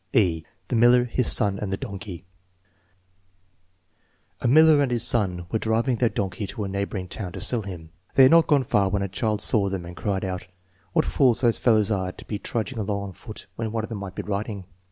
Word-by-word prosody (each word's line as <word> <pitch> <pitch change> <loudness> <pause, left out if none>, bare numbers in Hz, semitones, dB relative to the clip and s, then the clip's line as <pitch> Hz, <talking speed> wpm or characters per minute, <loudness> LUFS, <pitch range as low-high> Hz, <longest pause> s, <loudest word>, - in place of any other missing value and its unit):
(e) 85 -6 +2 0.3
The - - 0
Miller, 120 +2 +5
His 125 0 0
Son, 100 -1 +2
and 100 -2 -4
the 95 - -1
Donkey 100 -3 -7 2.1
A - - -1
miller 155 +3 +6
and 140 - +1
his 120 -2 0
son 90 -7 -1
were 110 - 0
driving 115 +3 0
their 120 -1 +2
donkey 95 0 -3
to 105 - -5
a - - -3
neighboring 100 -1 -3
town 90 -1 -5
to - - -6
sell 120 -3 +1
him. 85 -6 -9 0.2
They 135 - +7
had 130 - +7
not 165 0 +6
gone 145 -3 +3
far 100 -5 +1
when 100 0 -1
a - - -1
child 105 +2 -1
saw 100 -4 +3
them 95 -3 -4
and 90 +1 -9
cried 100 -1 -2
out: 90 -2 -5 0.2
" 90 +1 -37
What - - +2
fools 125 -5 +3
those 120 -3 +2
fellows 110 -3 +3
are 95 -2 -1
to - - -13
be 105 - -4
trudging 115 +3 -3
along 100 -1 -2
on - - -11
foot 110 +2 -11
when 110 -1 -3
one 110 -1 -2
of 110 - -6
them 110 -3 -5
might 95 -2 -7
be - - -4
riding." 100 -1 -4
105 Hz, 225 wpm, -24 LUFS, 95-115 Hz, 2.1 s, They